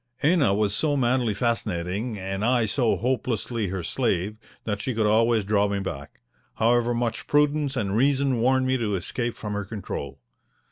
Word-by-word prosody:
Ena 145 - +4
was 105 -1 +1
so 145 +5 +1
madly 125 -2 +2
fascinating 105 -1 -2
and 95 +1 -4
I 120 0 +3
so 115 0 +1
hopelessly 120 -1 -1
her 90 -1 -4
slave 105 -1 -1 0.3
that 105 -2 -3
she 130 0 -3
could 110 -1 +1
always 110 +1 +3
draw 100 0 +2
me 100 0 -1
back, 85 -8 -6 0.3
however 120 +1 +2
much 115 -2 -2
prudence 145 -1 +2
and 100 -6 -1
reason 135 0 +2
warned 130 +1 +3
me 130 0 +1
to 110 -4 -1
escape 120 +6 -3
from 105 -1 -5
her 100 0 -2
control. 95 -9 -6
115 Hz, 170 wpm, -25 LUFS, 100-125 Hz, 0.3 s, Ena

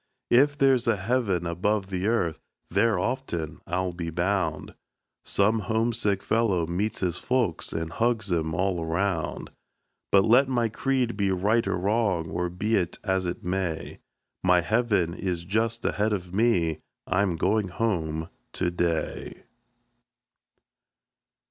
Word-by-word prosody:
If 145 +4 +5
there's 135 -4 +3
a 115 - +4
heaven 100 -3 0
above 95 +4 -1
the 95 +1 -1
earth, 95 -9 0 0.3
there 115 -4 +3
often, 90 - -3
I'll 90 +1 -1
be 85 -1 -4
bound, 85 -2 -1 0.5
Some 110 +3 +2
homesick 110 -1 0
fellow 110 -7 +1
meets 95 +6 -2
his 90 -3 -1
folks, 125 -9 0
and 80 0 -3
hugs 115 -4 0
'em 80 -1 -1
all 95 -1 0
around. 85 -1 -2 0.6
But 95 -1 +5
let 125 +5 +5
my 120 -3 +1
creed 125 0 0
be 100 -1 +1
right 105 +5 +1
or - - 0
wrong, 95 -4 0
or 90 0 -1
be 105 +6 0
it 90 -2 -1
as 95 -2 0
it 85 - -4
may, 90 -3 -3 0.4
My 90 -1 +5
heaven 100 -4 +1
is 90 -2 -3
just 110 +5 -1
ahead 105 +1 +1
of 90 -3 -4
me 90 -8 +2 0.3
I'm 90 -1 +1
going 100 +5 +1
home 80 -6 -1 0.3
to 90 -1 0
day. 85 -2 -2
95 Hz, 135 wpm, -26 LUFS, 85-115 Hz, 0.6 s, If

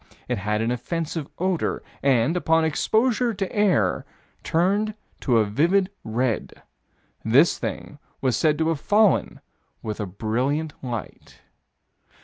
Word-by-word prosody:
It - - -1
had 105 +2 -1
an 115 +2 0
offensive 155 +4 -3
odor, 185 -2 -1 0.2
and, 135 +3 +3
upon 165 -2 +2
exposure 230 - +1
to 195 0 -1
the - - -10
air, 185 - +2 0.4
turned 200 +6 +1 0.2
to 125 -4 +2
a 110 - +4
vivid 175 - +2
red. 115 +1 -2 0.6
This 135 +9 +4
thing 145 - -5 0.2
was 130 -3 +1
said 150 +4 +2
to 160 0 +1
have 160 -3 -1
fallen 205 - +2 0.4
with 110 -1 -4
a 105 - -2
brilliant 125 - -1
light. 120 -5 -7
150 Hz, 130 wpm, -24 LUFS, 115-180 Hz, 0.6 s, a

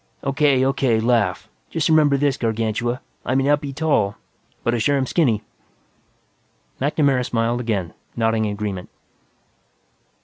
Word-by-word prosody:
"O.K., 135 -1 +2
O.K. 135 -4 +2
Laugh. 115 -5 +1 0.2
Just 160 -2 0
remember 155 -3 +4
this, 140 -1 +1
Gargantua; 115 +1 -1 0.2
I 130 - -1
may 135 - +3
not 145 +1 +2
be 140 -2 -5
tall, 135 -9 +1 0.5
but 120 - +1
I 120 - 0
sure 140 +6 +2
am 135 - 0
skinny." 125 - +1 1.4
MacNamara 140 -2 +2
smiled 120 0 0
again, 105 -8 -2 0.2
nodding 115 -1 +1
agreement. 100 -3 -4
125 Hz, 130 wpm, -21 LUFS, 110-140 Hz, 1.4 s, remember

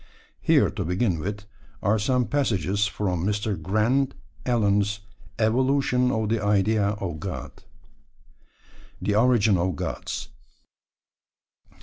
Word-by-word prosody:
Here - - +4
to - - -3
begin 90 0 0
with, 100 +4 -5 0.4
are 105 +3 +2
some 125 +4 +1
passages 105 - 0
from 90 -4 -2
Mr. 105 +1 -1
Grant 110 - +1 0.3
Allen's 105 -3 +1 0.4
Evolution 125 +2 +2
of 110 -2 -1
the 110 -2 0
Idea 105 0 +2
of 85 -6 -4
God. 90 +2 -5 1.5
THE 105 - -1
ORIGIN 110 -3 +4
OF 90 0 0
GODS. - - -4
105 Hz, 105 wpm, -25 LUFS, 100-115 Hz, 1.5 s, Here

